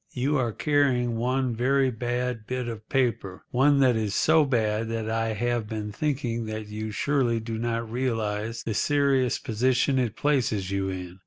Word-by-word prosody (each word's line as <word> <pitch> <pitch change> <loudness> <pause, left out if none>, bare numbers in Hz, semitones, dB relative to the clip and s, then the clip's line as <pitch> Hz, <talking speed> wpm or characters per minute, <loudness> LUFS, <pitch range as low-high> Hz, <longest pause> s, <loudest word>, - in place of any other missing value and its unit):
You 135 +4 0
are 120 -3 0
carrying 130 -3 +1
one 125 +2 0
very 130 +2 +2
bad 120 -1 -3
bit 125 -1 -3
of 110 -2 -7
paper—one 130 +3 +1
that 130 -3 +4
is 105 -2 -1
so 160 -1 +4
bad 110 -4 0
that 115 -1 -3
I 115 0 0
have 120 0 -1
been 105 -1 -4
thinking 120 -3 -2
that 110 0 -4
you 110 +1 -4
surely 120 0 +1
do 110 0 -5
not 115 0 -2
realise 115 -2 -2
the 115 - -2
serious 135 +2 +2
position 130 +4 +1
it 115 -4 -1
places 115 -10 0
you 95 0 -1
in. 90 0 -6
120 Hz, 165 wpm, -26 LUFS, 110-130 Hz, -, that